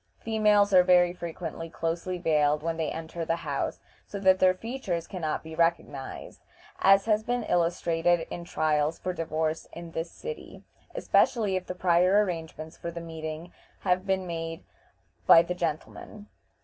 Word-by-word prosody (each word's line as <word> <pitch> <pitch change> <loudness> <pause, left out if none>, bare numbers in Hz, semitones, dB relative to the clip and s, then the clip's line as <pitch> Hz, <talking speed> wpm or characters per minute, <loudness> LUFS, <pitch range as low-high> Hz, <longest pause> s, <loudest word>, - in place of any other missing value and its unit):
Females 210 -2 +2
are 185 - +8
very 180 -1 +4
frequently 165 -1 -6
closely 170 +3 -3
veiled 150 -3 +2
when 165 0 -1
they 160 -2 -1
enter 165 +1 -5
the 165 +1 0
house, 150 -5 -3 0.3
so 205 - -6
that 190 -1 +4
their 185 0 +4
features 195 -6 -4
can 185 -3 -7
not 155 -1 -2
be 160 0 -9
recognized, 165 -5 -2 0.4
as 195 0 +5
has 215 -1 +2
been 245 +1 -2
illustrated 170 -1 +1
in 175 - -5
trials 155 -1 0
for 185 - -3
divorce 160 -1 -2
in 170 0 -8
this 165 +1 -4
city, 470 - -9 0.3
especially 210 -6 +2
if 185 -1 -3
the 180 - -5
prior 180 +3 +4
arrangements 160 -3 -6
for 170 - -6
the 170 0 -6
meeting 160 0 -7 0.3
have 185 +1 0
been 190 -1 0
made 165 -1 -5 0.6
by 165 - +9
the 180 - -3
gentlemen. 175 +4 -5
170 Hz, 160 wpm, -27 LUFS, 165-185 Hz, 0.6 s, by